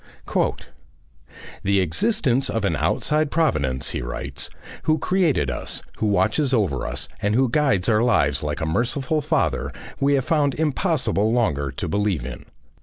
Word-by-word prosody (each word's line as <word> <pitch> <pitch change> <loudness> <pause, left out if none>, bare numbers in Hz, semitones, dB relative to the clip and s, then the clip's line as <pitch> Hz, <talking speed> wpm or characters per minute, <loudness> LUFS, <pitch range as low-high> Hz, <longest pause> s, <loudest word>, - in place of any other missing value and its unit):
"The 100 0 +2
existence 135 - +1
of 115 -2 -1
an 85 -5 +1
outside 150 - +1
Providence," 70 - 0
he - - -3
writes, - - -4 0.4
"who 155 0 +3
created 155 - +1
us, - - -4 0.2
who 110 - +1
watches 115 +8 +2
over 90 - 0
us, - - -3
and 105 +1 +1
who 130 +2 +4
guides 130 -9 +2
our 110 -1 +3
lives 70 - +2
like 75 -1 -3
a - - 0
Merciful 130 - 0
Father, 155 0 0 0.3
we 140 +1 +3
have 135 -2 0
found 145 -4 +2
impossible 150 - +1
longer 75 - +1
to - - -4
believe 100 -10 0
in. 65 -1 -8
115 Hz, 150 wpm, -23 LUFS, -, 0.4 s, who